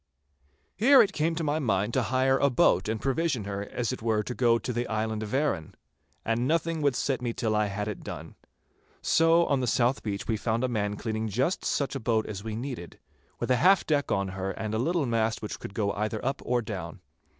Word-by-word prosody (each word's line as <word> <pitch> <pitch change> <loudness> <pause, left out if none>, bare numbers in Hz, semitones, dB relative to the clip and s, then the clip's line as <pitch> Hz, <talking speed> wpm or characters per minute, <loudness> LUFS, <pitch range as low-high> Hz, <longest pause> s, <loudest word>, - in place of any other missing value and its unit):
Here 265 +7 +6
it 195 - -3
came 165 0 0
to 165 - -2
my 150 +1 0
mind 105 -4 0
to 130 - +2
hire 130 +2 +2
a 140 - +4
boat 110 -5 +3
and 110 0 -1
provision 135 -2 0
her 100 0 -4
as 120 -1 -2
it 130 - -5
were 110 -1 +1
to 125 - -4
go 120 -2 +3
to 125 +2 -4
the 120 +1 -2
island 110 0 -2
of 105 -1 -5
Arran. 130 - -1 0.5
And 115 +2 0
nothing 165 0 0
would 140 -3 +2
set 135 0 -1
me 120 -1 -2
till 115 -3 -1
I 105 0 +2
had 105 +1 -3
it 105 - -5
done. - - -7 0.7
So 165 +1 +4
on 140 - +1
the 125 - -1
south 120 +3 +2
beach 100 -2 -4
we 110 - 0
found 115 +2 -1
a - - +2
man 105 -4 -1
cleaning 110 +1 -3
just 130 - 0
such 140 - -1
a 135 - -3
boat 110 -2 +1
as 100 -2 -6
we 110 -1 -4
needed, 120 -7 -6 0.4
with - - -1
a 125 - +4
half 185 +7 +5
deck 145 -2 0
on 100 -1 0
her 95 +1 -4
and 110 +2 -4
a 110 - 0
little 165 +4 +1
mast 115 -2 0
which 105 - -5
would 100 - -8
go 100 -2 0
either 110 +2 -2
up 135 +1 -1
or 120 -1 0
down. 90 -7 -6
115 Hz, 230 wpm, -28 LUFS, 105-135 Hz, 0.7 s, Here